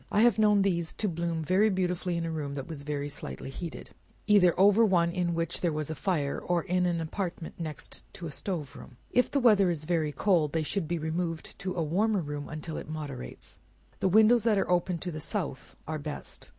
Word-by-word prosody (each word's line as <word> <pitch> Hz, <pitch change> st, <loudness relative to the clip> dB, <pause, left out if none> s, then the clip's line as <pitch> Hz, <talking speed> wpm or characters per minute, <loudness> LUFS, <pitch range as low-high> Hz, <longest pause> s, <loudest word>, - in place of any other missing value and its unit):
I 210 Hz, -, +3 dB
have 235 Hz, -1 st, +5 dB
known 210 Hz, -2 st, +5 dB
these 170 Hz, -4 st, 0 dB
to 215 Hz, -, -1 dB
bloom 170 Hz, -2 st, -2 dB
beautifully 185 Hz, -1 st, +1 dB
in 165 Hz, -, -2 dB
a 165 Hz, -, -2 dB
room 145 Hz, -3 st, -3 dB
that 135 Hz, -2 st, -4 dB
was 160 Hz, -4 st, -6 dB
very 145 Hz, 0 st, -3 dB
slightly 135 Hz, -1 st, -6 dB
heated 165 Hz, +3 st, -7 dB, 0.3 s
either 190 Hz, -5 st, +5 dB
over 205 Hz, +3 st, +6 dB
one 175 Hz, -5 st, +3 dB
in 175 Hz, -1 st, -1 dB
which 165 Hz, 0 st, -1 dB
there 175 Hz, -, +2 dB
was 155 Hz, 0 st, -3 dB
fire, 155 Hz, -4 st, -1 dB
or 175 Hz, -2 st, 0 dB
in 180 Hz, 0 st, +1 dB
an 170 Hz, -1 st, 0 dB
apartment 170 Hz, +1 st, -4 dB
next 155 Hz, -3 st, -6 dB, 0.2 s
a 170 Hz, -3 st, -5 dB
stove 155 Hz, -2 st, -4 dB
room. 125 Hz, -, -12 dB
If 250 Hz, -, +3 dB
the 285 Hz, -, +1 dB
weather 210 Hz, -7 st, +5 dB
is 155 Hz, -3 st, -2 dB
very 160 Hz, -3 st, +1 dB
cold, 155 Hz, -1 st, +2 dB
they 160 Hz, -1 st, +1 dB
should 165 Hz, +2 st, -2 dB
be 170 Hz, +1 st, -1 dB
removed 165 Hz, +1 st, -3 dB
to 185 Hz, -1 st, -3 dB
a 170 Hz, -, 0 dB
warmer 200 Hz, +6 st, +1 dB
room, 145 Hz, -2 st, -5 dB
until 155 Hz, +1 st, -5 dB
it -, -, -7 dB
moderates. 145 Hz, -, -6 dB, 0.4 s
The 190 Hz, -, +2 dB
windows 220 Hz, +3 st, +6 dB
that 220 Hz, -3 st, +3 dB
are 195 Hz, -, 0 dB
open 175 Hz, 0 st, +2 dB
to 180 Hz, +2 st, -4 dB
the 155 Hz, -, -5 dB
south 155 Hz, -, -3 dB
are 155 Hz, 0 st, -3 dB
best. 150 Hz, 0 st, -7 dB
170 Hz, 210 wpm, -29 LUFS, 155-190 Hz, 0.4 s, over